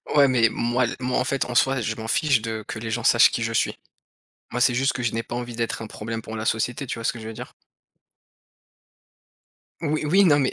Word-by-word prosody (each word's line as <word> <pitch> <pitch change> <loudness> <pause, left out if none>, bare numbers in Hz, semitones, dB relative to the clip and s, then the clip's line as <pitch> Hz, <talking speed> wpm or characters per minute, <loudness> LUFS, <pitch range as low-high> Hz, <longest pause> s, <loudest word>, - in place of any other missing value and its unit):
ouais, 140 -2 +6
mais 120 -3 +4
moi 120 +2 0
l 120 - -2
moi, 125 0 0
en 125 - +1
fait, 135 0 0
en 125 - -5
soi, 135 +2 +3
je 110 -1 -2
m'en 110 0 -6
fiche 130 +2 +2
de 110 -1 -4
que - - -5
les 115 0 -5
gens - - -1
sachent - - +6
qui - - -2
je - - -1
suis. - - 0 0.7
Moi, 125 - -3
c'est 125 0 +4
juste 135 +3 +2
que 125 - -4
je 120 - 0
n'ai 115 - -1
pas 120 - -6
envie 120 -1 -5
d'être 115 0 -2
un - - -6
problème 115 +1 -6
pour 110 - -8
la 110 - -4
société, 120 +5 -1
tu - - -4
vois 115 - -7
ce - - +2
que 115 - -9
je 110 - -8
veux - - -6
dire? - - -9 2.3
Oui, 155 -1 -1
oui, 190 +7 +4
non, 150 -5 +5
mais 135 -2 +1
120 Hz, 255 wpm, -24 LUFS, 115-135 Hz, 2.3 s, ouais